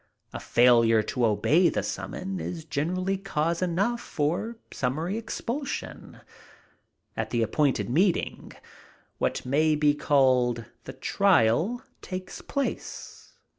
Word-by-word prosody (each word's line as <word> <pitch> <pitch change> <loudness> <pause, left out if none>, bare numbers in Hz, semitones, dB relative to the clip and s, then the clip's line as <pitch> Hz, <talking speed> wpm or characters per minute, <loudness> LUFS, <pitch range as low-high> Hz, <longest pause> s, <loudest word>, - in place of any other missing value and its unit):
A - - -4
failure 115 -2 +4
to 120 +2 0
obey 155 - +3
the - - -2
summons 190 -1 -4
is 165 -3 -5
generally 185 +6 -1
cause 170 -3 -1
enough 200 +7 0
for 175 +6 -2 0.2
summary 155 +9 -2
expulsion. 230 +4 -5 0.9
At - - -3
the 120 -1 +1
appointed 135 +5 +1
meeting, 175 +8 0 0.7
what - - -1
may 155 +4 +2
be 150 -1 +3
called 130 -5 +2 0.2
the 130 - -7
trial, 180 - +2 0.2
takes 185 0 -7
place. 280 -1 -5
155 Hz, 110 wpm, -27 LUFS, 130-190 Hz, 0.9 s, failure